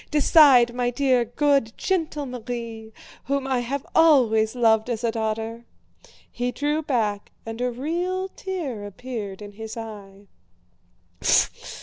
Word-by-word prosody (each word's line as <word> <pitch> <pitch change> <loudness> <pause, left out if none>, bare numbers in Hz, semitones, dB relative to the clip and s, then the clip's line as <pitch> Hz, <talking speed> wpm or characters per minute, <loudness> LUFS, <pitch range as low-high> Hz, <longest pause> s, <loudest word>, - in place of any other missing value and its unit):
Decide, 280 -5 +6
my 245 0 0
dear, 255 -1 +2
good, 275 -1 +1
gentle 320 -6 -1
Marie, 230 -3 -6 0.3
whom 280 0 -1
I 260 -2 0
have 260 +3 -3
always 245 -9 +4
loved 225 -1 +3
as 235 -1 -3
a 230 - +1
daughter!" 225 +1 -3 0.7
He 245 0 -2
drew 295 +4 -1
back 220 -8 -1
and 225 +1 -6
a 250 - +1
real 345 +9 -2
tear 330 - -5
appeared 205 -2 -7
in 205 - -9
his 220 +2 -8
eye. 205 -3 -9
245 Hz, 125 wpm, -24 LUFS, 220-280 Hz, 0.7 s, Decide